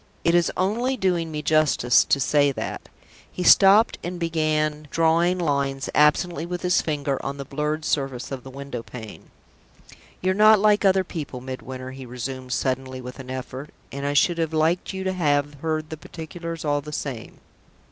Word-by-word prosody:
"It 170 - +3
is 175 -1 +3
only 235 +8 0
doing 175 -5 0
me 150 -1 -4
justice 150 -5 +4
to 140 - +2
say 145 +1 +3
that." - - -6 0.4
He 180 - -4
stopped 200 +4 +6
and 175 +1 -5
began 155 -2 0
drawing 165 +3 +2
lines 140 -5 -1
absently 150 +2 +3
with 175 +1 -5
his 180 0 +3
finger 145 -3 -2
on 140 +1 -4
the 140 - -6
blurred 150 +3 -2
surface 135 -4 -2
of 130 -2 -5
the 135 - -10
window 135 -2 -6
pane. 115 -2 -11 0.9
"You're 185 +1 +1
not 215 +2 +6
like 210 +1 +3
other 190 -1 +4
people, 150 -8 -6
Midwinter," 130 0 -7
he 130 -1 -9
resumed, 125 +1 -6
suddenly, 130 0 -2
with 125 +1 -9
an 130 -1 -9
effort; 130 +2 -6 0.2
"and 140 0 -6
I 145 0 0
should 170 +4 +3
have 160 -1 -1
liked 160 +3 +1
you 190 -1 -5
to 190 0 -1
have 145 -4 +1
heard 155 -1 -2
the 160 - -5
particulars 165 +1 -7
all 145 -1 +1
the 150 +1 -9
same." 135 -6 -6
150 Hz, 180 wpm, -24 LUFS, 135-175 Hz, 0.9 s, stopped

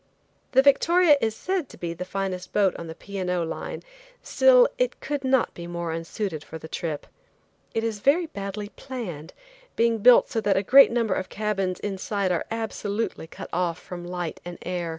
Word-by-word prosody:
The 265 +1 +6
Victoria 325 +4 +5
is 220 -1 0
said 370 +2 -2
to - - -13
be 170 -1 -4
the 180 +2 -6
finest 185 -1 -4
boat 200 -3 +3
on 170 - -7
the 160 - -7
P. 200 +3 -7
and 185 -1 -2
O. 180 -1 +1
Line, 165 - -5 0.4
still - - +6
it - - 0
could 290 -2 -3
not 260 -2 +2
be 170 0 -8
more 170 -1 -4
unsuited 165 0 -4
for 160 - -8
the 160 - -10
trip. 160 -2 -4 0.7
It 225 - 0
is 225 -2 -2
very 295 - +3
badly 205 -7 -6
planned, 195 - -7 0.4
being 230 -1 +2
built 245 +3 +7
so 225 - -2
that 200 -3 +2
a 195 - +1
great 270 +5 +7
number 230 -4 +1
of 185 - -3
cabins 195 -4 -2
inside 200 -1 -2
are 175 - 0
absolutely 220 -4 -3
cut - - -9
off 175 -1 0
from 175 -1 -8
light 175 -1 -5
and 175 0 -7
air. 175 -2 -3
200 Hz, 190 wpm, -25 LUFS, 175-235 Hz, 0.7 s, built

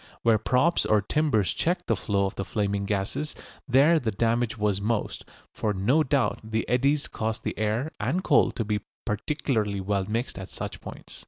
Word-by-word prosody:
Where 115 -2 +4
props 130 +10 +2
or 105 -1 +2
timbers 135 - +1
checked 175 +2 -1
the - - +1
flow 100 -2 0
of 95 - -2
the 95 - -3
flaming 100 -1 -1
gases 105 +10 -2 0.3
there 145 +6 +5
the 120 -6 -1
damage 115 +2 0
was 105 -2 +1
most, 110 +1 -2 0.3
for 105 -2 -1
no 120 +12 +3
doubt 140 -3 +1
the 110 0 -2
eddies 140 +4 +2
caused 110 0 -3
the - - -3
air 110 +8 -1
and 185 +3 0
coal - - +4
to 115 - -2
be 105 0 0 0.3
particularly 110 -3 -1
well 95 0 -1
mixed 115 -2 -2
at 95 - -7
such - - -6
points. - - -9
110 Hz, 180 wpm, -26 LUFS, 105-135 Hz, 0.3 s, there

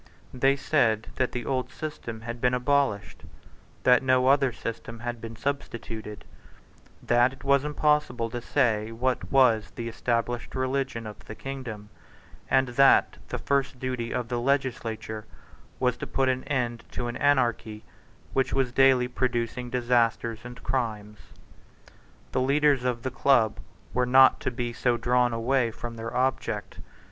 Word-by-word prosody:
They 135 +2 +3
said 115 -7 +1
that 130 - +1
the 120 -2 -4
old 130 -1 -2
system 115 -7 -6
had 115 +1 -6
been 125 0 +3
abolished; 125 -6 0 0.6
that 125 -1 +5
no 130 0 +3
other 135 -2 +4
system 115 0 -7
had 120 -1 -4
been 115 0 -7
substituted; 115 -5 -5 0.8
that 120 +2 +3
it 135 - -15
was 140 0 +3
impossible 150 -5 +1
to 120 - -4
say 115 -5 +1
what 125 +3 -2
was 115 -6 +4
the 115 - -5
established 120 +1 -2
religion 130 -3 -2
of 105 -1 -9
the 110 - -8
kingdom; 120 -7 -7 0.6
and 130 0 +3
that 135 +3 +4
the - - -4
first 140 -1 0
duty 125 -2 -3
of 120 - -2
the 120 0 -2
legislature 115 -5 -2 0.5
was 125 -2 +1
to - - -6
put 135 -1 +1
an 130 0 -1
end 120 -4 -2
to 120 - -3
an 120 0 -4
anarchy 115 -6 +1 0.5
which 135 -1 +1
was 135 -2 +1
daily 130 -1 +4
producing 125 -1 -2
disasters 120 -2 +1
and 120 0 -10
crimes. 105 -5 -3 1.1
The 130 - 0
leaders 140 0 +3
of 125 -2 -1
the 130 - -2
Club 125 -4 +3 0.3
were 125 0 +1
not 130 +1 +6
to - - -1
be 120 -1 -4
so 120 +1 +1
drawn 125 +1 +2
away 120 +1 +1
from 115 +1 -7
their 115 +2 -5
object. 130 +1 -1
125 Hz, 150 wpm, -27 LUFS, 115-130 Hz, 1.1 s, not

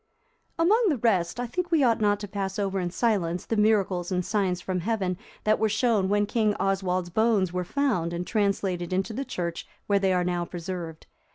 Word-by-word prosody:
] - - -43
Among 420 +8 +4
the 295 - +1
rest, 200 -4 +1
I 245 - -1
think 350 +9 -3
we 325 -4 +3
ought 230 -3 +3
not 205 -1 +2
to 205 - -5
pass 195 -1 -4
over 195 -1 -1
in 180 -1 -1
silence 180 -4 0
the 225 - -1
miracles 200 -4 +2
and 180 -1 0
signs 195 -4 0
from 180 0 -2
Heaven 190 -1 -1 0.3
that 215 0 +2
were 220 - +2
shown 220 -3 +2
when 205 0 +2
King 215 -1 +1
Oswald's 185 -2 -1
bones 210 -3 +2
were 180 0 -1
found, 215 -6 0
and 175 +1 -3
translated 195 -4 -1
into 195 +4 -1
the 270 - -3
church 170 -9 -4 0.2
where 200 -1 +2
they 195 -1 +2
are 180 -1 +2
now 175 -1 -1
preserved. 175 -2 -6
195 Hz, 205 wpm, -26 LUFS, 180-220 Hz, 0.3 s, Among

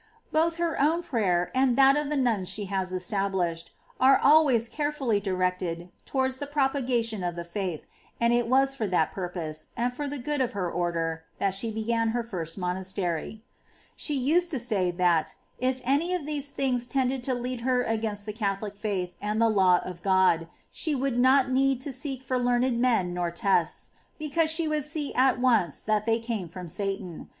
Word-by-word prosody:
Both 330 +1 +2
her 335 -3 -1
own 325 +4 +2
prayer, 190 - 0
and 260 -2 +2
that 275 0 +7
of 295 -1 -1
the 300 - -1
nuns 225 -8 +1
she 205 +1 -4
has 190 -1 -2
established, 185 -2 -1 0.3
are 265 +1 +6
always 280 -6 +4
carefully 290 -7 -1
directed 180 -3 -2
towards 260 -1 0
the 285 - -4
propagation 255 -7 0
of 175 -1 -2
the 170 - -5
faith; 170 -2 -4 0.3
and 235 0 +3
it 240 -1 +2
was 270 +2 +3
for 225 -6 -2
that 175 -4 +1
purpose, 175 -4 -4
and 245 +1 0
for 290 +3 -4
the 285 +1 -4
good 290 +2 -2
of 255 -1 -1
her 180 -4 -2
Order, 165 -2 -2
that 195 -1 0
she 200 +4 -1
began 225 +1 0
her 240 - -1
first 175 -7 -5
monastery. 185 +1 -3 0.5
15. - - -38
She 300 - -1
used 320 +7 +2
to 305 - -2
say 215 -7 0
that, 175 -3 +1 0.2
if 255 +1 0
any 295 +8 +1
of 340 -5 -4
these 290 -2 -3
things 250 -3 -1
tended 260 0 0
to 255 +1 -1
lead 245 0 -4
her 250 0 +1
against 220 -3 -2
the 210 - -4
Catholic 205 -1 -3
faith 195 -4 -3
and 210 +1 -1
the 230 0 +4
law 190 -4 +4
of 180 -2 -8
God, 185 -4 +3 0.2
she 310 -3 -1
would 265 -2 0
not 260 +1 +4
need 270 0 +2
to 275 0 -3
seek 265 -1 -5
for 255 0 -1
learned 245 0 +1
men 225 -8 +2
nor 175 -1 -1
tests, 170 -1 0 0.3
be 305 -2 -6
cause 325 +1 +2
she 320 0 +1
would 305 -1 0
see 300 0 -3
at 255 -1 +3
once 230 - +2
that 215 0 0
they 225 0 +3
came 225 -6 -4
from 180 +1 -8
Satan. 195 -1 -4
230 Hz, 195 wpm, -27 LUFS, 185-270 Hz, 0.5 s, that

